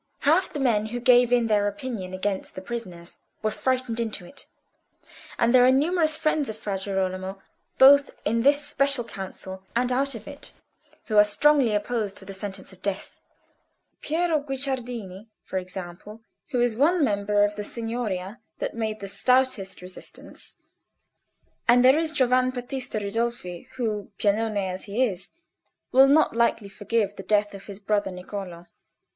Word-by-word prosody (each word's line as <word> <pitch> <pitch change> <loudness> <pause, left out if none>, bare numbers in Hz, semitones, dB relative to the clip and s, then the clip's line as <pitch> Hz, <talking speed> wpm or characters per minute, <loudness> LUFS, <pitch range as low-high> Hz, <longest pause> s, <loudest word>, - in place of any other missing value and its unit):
Half 325 +6 +3
the 295 - -4
men 220 -5 +2
who 240 +2 -4
gave 245 -1 +5
in 245 -1 +3
their 210 -2 +2
opinion 205 -2 -5
against 190 +1 -3
the 185 - -6
prisoners 185 -7 -7 0.2
were 215 - +1
frightened 255 -2 -1
into 220 -6 -2
it, 280 - -10 0.9
and 235 +1 +2
there 250 -1 +7
are 255 - +6
numerous 310 +3 +2
friends 310 -4 0
of 220 - -6
Fra 205 -2 -3
Girolamo 190 0 -3 0.4
both 280 +1 +7 0.2
in 230 +2 +1
this 285 +3 +3
Special 275 -3 +1
Council 190 -3 -8
and 245 +1 +1
out 275 +1 0
of 220 -1 -10
it 285 0 -11 0.5
who 215 - -1
are 210 - +9
strongly 250 +2 +3
opposed 210 -1 -2
to 190 - -6
the 195 - -8
sentence 190 -1 -6
of 190 - -18
death—Piero 310 - -4
Guicciardini, 250 -8 -4 0.2
for 190 - -3
example, 185 +4 -9 0.3
who 250 - -1
is 240 -2 +2
one 315 +7 +3
member 205 -3 +2
of 205 0 0
the 210 - -4
Signoria 225 -3 -4 0.2
that - - -3
made 220 -2 -3
the 200 - -5
stoutest 225 -3 +1
resistance; 185 0 -10 1.1
and 245 +1 +6
there 265 +4 +6
is 325 -1 0
Giovan 255 -3 +3
Battista 250 -1 -4
Ridolfi, 205 -4 -3
who, 215 -5 -3
Piagnone 215 +1 +1
as 185 0 -5
he 215 +5 0
is, 190 -5 -5 0.6
will 265 +1 +7
not 295 -2 +4
lightly 230 -3 +1
forgive 205 0 -1
the - - -5
death 205 +1 +1
of 195 0 -11
his 200 -1 -8
brother 205 -1 0
Niccolò." 180 -1 -7
225 Hz, 160 wpm, -25 LUFS, 200-255 Hz, 1.1 s, are